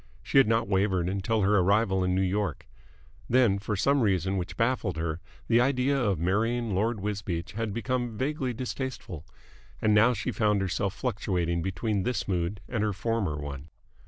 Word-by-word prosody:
She 135 - +4
had 135 - +5
not 115 +1 +2
wavered 95 -3 +1
until 100 +3 0
her 100 +1 +4
arrival 95 0 +2
in 90 0 +1
New 95 - +2
York. 100 +2 -2 0.6
Then, 115 -5 +4
for 105 +1 -2
some 140 +8 +2
reason 95 -3 +1
which 90 -1 -4
baffled 115 -7 0
her, 80 +1 -3 0.3
the 120 +1 +4
idea 130 +1 +2
of 105 -9 +1
marrying 110 +6 0
Lord 110 +4 0
Wisbeach 95 -4 -3
had 110 0 -3
become 120 0 -2
vaguely 135 0 -1
distasteful. 120 - -5 0.5
And 110 -1 +2
now 115 +4 +5
she 95 - -3
found 105 -3 +2
herself 95 +1 -1
fluctuating 90 -8 -1
between 95 +3 -1
this 120 +2 -2
mood 90 +1 -1
and 120 -4 -2
her 105 -1 0
former 105 -6 -1
one. 75 0 -7
105 Hz, 170 wpm, -28 LUFS, 95-115 Hz, 0.6 s, had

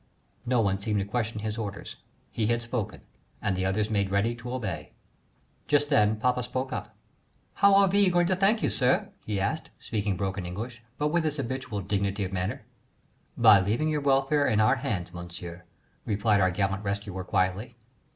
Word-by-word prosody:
No 125 -1 +3
one 95 -2 +1
seemed 105 +1 -1
to 100 - 0
question 110 0 -2
his 110 +1 -3
orders. 100 -2 -6 0.3
He 110 -2 -1
had 120 +1 0
spoken 115 -3 -4 0.4
and 100 -2 -1
the 95 0 -1
others 105 +3 0
made 100 -2 +1
ready 100 +4 +1
to 120 +1 -7
obey. 110 -9 -4 0.7
Just 145 0 +2
then 105 -6 +4
papa 125 +3 +1
spoke 130 +2 -3
up: - - -6 0.6
"How 200 -1 +5
are 195 0 +6
we 200 0 +4
going 175 -1 +3
to 185 +2 +2
thank 200 +4 +2
you, - - +2
sir?" 125 -1 +2 0.2
he 105 -2 -1
asked, 100 - -2
speaking 100 -3 -2
broken 95 -1 -2
English, 110 +7 -6 0.2
but 150 0 +1
with 170 +1 +1
his 155 -1 -1
habitual 130 -6 -3
dignity 100 +1 -1
of 95 0 -4
manner. 95 +2 -2 0.7
"By 100 - +8
leaving 110 +11 0
your 150 -1 0
welfare 140 +1 +3
in 110 -4 +2
our 110 +5 +4
hands, 95 -8 -3
Monsieur," 85 0 -8 0.4
replied 105 -1 +2
our 95 - +4
gallant 95 +2 -1
rescuer 100 -2 -3
quietly. 95 +5 -1
110 Hz, 180 wpm, -27 LUFS, 100-130 Hz, 0.7 s, By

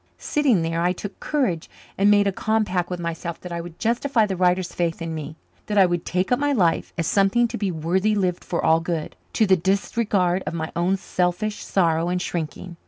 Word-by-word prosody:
Sitting 265 - +1
there, 165 +1 -1
I 180 +1 +2
took 200 +2 -8
courage 230 - -1 0.3
and 200 +1 +3
made 205 -1 +5
a 200 - +2
compact 205 -3 0
with 180 -1 -4
myself 170 0 -4
that 180 - -8
I 170 0 -3
would 170 0 -10
justify 235 0 +1
the 195 -2 -3
writer's 180 0 +1
faith 170 -1 -1
in 165 -1 -4
me 155 0 -6 0.3
that 210 - -1
I 195 - +7
would 175 -1 -2
take 185 +3 -1
up 250 - +3
my 290 0 +1
life 180 -9 +1
as 165 - 0
something 200 +7 +3
to - - -4
be 200 -2 0
worthily 185 +6 0
lived 185 -3 0
for 170 - -2
all 160 0 +5
good, 165 -2 -3 0.2
to 220 - +3
the 190 -2 +5
disregard 190 0 +1
of - - -2
my 160 -1 -3
own 180 +3 +1
selfish 185 +3 -1
sorrow 170 -2 +1
and 180 0 0
shrinking. 170 +1 -5
180 Hz, 215 wpm, -23 LUFS, 170-205 Hz, 0.3 s, I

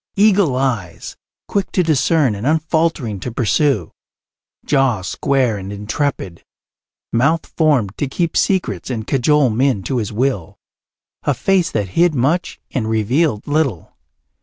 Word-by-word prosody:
Eagle 200 -8 +3
eyes, 105 -11 -3 0.3
quick 200 -1 -1
to 185 - +2
discern 155 -4 +2
and 105 +5 -4
unfaltering 155 - 0
to 120 - -5
pursue; 115 - +1 0.7
jaw 135 -9 +1
square 125 +3 0
and 95 +1 -7
intrepid; 105 - -3 0.7
mouth 140 +8 +2
formed 135 - +1
to 145 - 0
keep 165 +5 -2
secrets 180 - 0
and 115 -4 -3
cajole 135 0 +2
men 120 -3 +1
to 130 - -2
his 110 -4 -2
will 110 -6 -2 0.6
a - - 0
face 190 -3 +1
that 105 - -2
hid 170 - +2
much 140 +8 0
and 110 -4 -2
revealed 110 +3 +1
little. 145 - -1
135 Hz, 135 wpm, -18 LUFS, 110-155 Hz, 0.7 s, Eagle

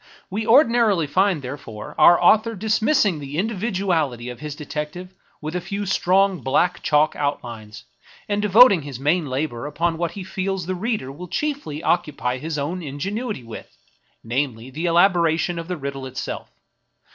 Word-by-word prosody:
We 215 +3 -3
ordinarily 230 - +4
find, 185 0 +1
therefore, 125 -5 -8
our 175 - +7
author 220 +5 +4
dismissing 215 - +2
the 140 +1 -6
individuality 185 - -1
of 120 -1 -8
his 150 0 -6
detective 150 +5 -6 0.3
with 155 +3 -5
a 180 - -1
few 200 +3 -4
strong 190 0 +2
black 145 +7 +1
chalk 150 +1 +2
outlines, 115 -7 -4 0.4
and 205 0 0
devoting 210 -2 +7
his 140 -4 -8
main 150 +3 +1
labor 130 -1 -3
upon 165 +2 -1
what 170 -1 -1
he 195 - -6
feels 190 -1 -3
the 185 - -2
reader 195 - -2
will 175 +6 -9
chiefly 275 - -3
occupy 130 -7 0
his 155 +2 -4
own 165 +6 -3
ingenuity 195 - -4
with, 115 -1 -11 0.3
— - - -42
namely, 125 0 -3
the 160 +6 -3
elaboration 170 -1 +3
of 165 - -7
the 180 -1 -3
riddle 135 -2 -5
itself. 130 - -6
170 Hz, 155 wpm, -22 LUFS, 140-195 Hz, 0.4 s, our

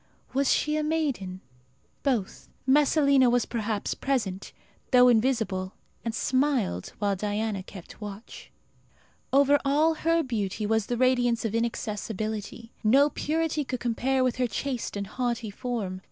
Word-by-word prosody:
Was 275 +1 +2
she 300 0 +1
a 305 - 0
maiden? 275 -13 -2 0.6
Both. 240 -9 -2 0.2
Messalina 280 -1 +4
was 245 0 +2
perhaps 220 -3 -2
present, 215 -9 -2 0.4
though 250 -1 +7
invisible, 220 -6 +1 0.3
and 230 -1 -3
smiled, 255 - 0
while 200 -1 0
Diana 210 +1 -2
kept 185 +2 -12
watch. 205 +1 -9 0.8
Over 280 +1 +5
all 300 +4 +3
her 330 +1 +1
beauty 215 -5 -2
was 220 0 +1
the 240 - -1
radiance 245 -2 +2
of 220 - -1
inaccessibility. 220 -1 -3
No 275 +7 +5
purity 315 0 -1
could 255 -2 -4
compare 255 +2 0
with 255 -1 0
her 250 -1 +1
chaste 250 -3 -3
and 200 - -3
haughty 235 -1 -3
form. 205 -5 -4
240 Hz, 135 wpm, -27 LUFS, 210-275 Hz, 0.8 s, though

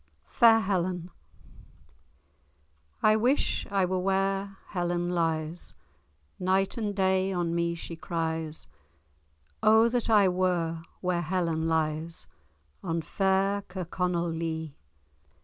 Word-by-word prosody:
*FAIR 225 -1 +5
HELEN* 180 -3 -1 1.9
I 215 0 +6
wish 245 +6 +1
I 195 -2 +2
were 185 +1 -1
where 195 +1 0
Helen 175 -1 -1
lies; 165 -1 -2 0.6
Night 190 +1 +1
and 210 -3 -2
day 190 0 +2
on 175 -2 -1
me 170 0 0
she 170 0 -7
cries; 160 -2 -3 0.9
O 220 +1 +6
that 240 -1 -1
I 210 -3 +6
were 180 -3 0 0.2
where 180 -1 0
Helen 165 -2 -1
lies, 160 0 -1 0.6
On 165 0 -2
fair 195 +3 +1
Kirkconnell 180 -1 -2
Lee! 160 -2 -4
180 Hz, 105 wpm, -28 LUFS, 165-195 Hz, 1.9 s, I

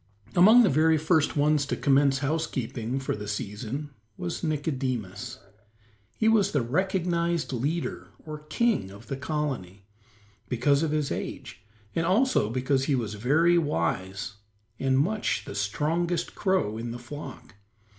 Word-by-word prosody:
Among 215 +7 +8
the - - +5
very 160 +3 +4
first 155 -1 +2
ones 150 0 +3
to - - -1
commence 140 -1 +3
housekeeping 130 -5 -2
for 135 - -2
the 105 0 -7
season 110 +8 -4 0.3
was 85 - -4
Nicodemus. 130 - -2 0.8
He 220 - +2
was 210 -3 +4
the 145 -5 +2
recognized 170 +2 0
leader, 145 +8 -2 0.2
or 155 -1 -6
king 150 - 0
of 100 +4 -12
the 135 - -4
colony, 130 - -3 0.6
because 140 +4 +2
of 160 - +1
his 150 -2 -1
age - - -5 0.3
and 165 - 0
also 190 - +3
because 130 +3 0
he 140 - +2
was 110 -5 -2
very 155 +11 +3
wise 95 - -2 0.4
and 135 -1 +2
much 205 +10 0
the - - -7
strongest 155 - -1
crow 185 - 0
in 115 +1 -4
the 120 - -5
flock. 135 +3 -9
145 Hz, 140 wpm, -27 LUFS, 120-165 Hz, 0.8 s, Among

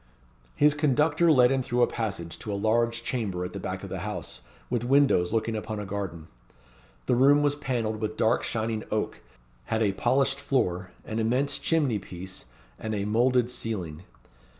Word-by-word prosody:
His 150 0 +5
conductor 150 +3 +3
led 125 -3 +6
him 135 -1 +2
through 125 -1 +1
a - - +7
passage 95 -10 -4
to 105 - -5
a - - -1
large 115 +2 +1
chamber 100 -8 -2
at 90 - -7
the - - -5
back - - -5
of - - -6
the - - -3
house, - - -5 0.3
with 120 -2 -1
windows 135 -9 +3
looking 115 0 0
upon 110 0 -4
a 105 - -4
garden. 95 -5 -5 0.8
The 125 - +2
room 140 +4 +5
was 145 0 +2
panelled 120 -6 -2
with 110 0 -3
dark 110 +2 +2
shining 110 -1 -2
oak, 110 0 -2 0.4
had 110 0 0
a 100 - +2
polished 135 +6 +1
floor, 95 -8 0 0.2
an 110 0 -3
immense 125 +6 +1
chimney 145 -10 +1
piece, 95 -4 -9 0.3
and 110 -1 -3
a 100 -1 -2
moulded 120 +3 +2
ceiling. 90 -10 -4
115 Hz, 175 wpm, -27 LUFS, 105-130 Hz, 0.8 s, a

